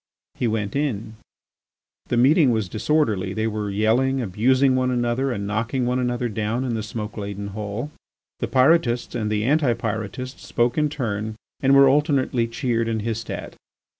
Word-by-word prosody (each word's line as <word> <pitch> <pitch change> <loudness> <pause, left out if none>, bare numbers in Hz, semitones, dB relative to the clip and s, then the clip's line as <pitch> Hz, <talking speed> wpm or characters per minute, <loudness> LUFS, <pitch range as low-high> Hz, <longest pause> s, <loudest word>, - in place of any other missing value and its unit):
He 120 - -1
went 110 -1 -2
in. 115 -7 -2 0.9
The 120 - 0
meeting 140 +4 +5
was 110 -4 0
disorderly; 105 - 0
they 110 - 0
were 105 -2 -2
yelling, 115 +7 +2
abusing 130 +5 +2
one 130 0 +1
another 125 +2 0
and 100 -4 -3
knocking 115 +5 -1
one 125 +1 0
another 125 -1 -1
down 110 +3 -2
in 125 -3 -2
the 110 - -2
smoke 105 0 -6
laden 100 -1 -5
hall. 105 +7 -5 0.5
The - - -1
Pyrotists 130 -3 +3
and 105 -1 -2
the 105 0 0
Anti 140 0 +3
Pyrotists 115 +3 -5
spoke 120 0 0
in 150 -1 +2
turn 110 -6 -3 0.2
and 135 0 +4
were 140 0 +8
alternately 135 -4 +2
cheered 115 -1 -1
and 110 -2 -2
hissed 115 0 -3
at. - - -6
120 Hz, 165 wpm, -23 LUFS, 110-130 Hz, 0.9 s, were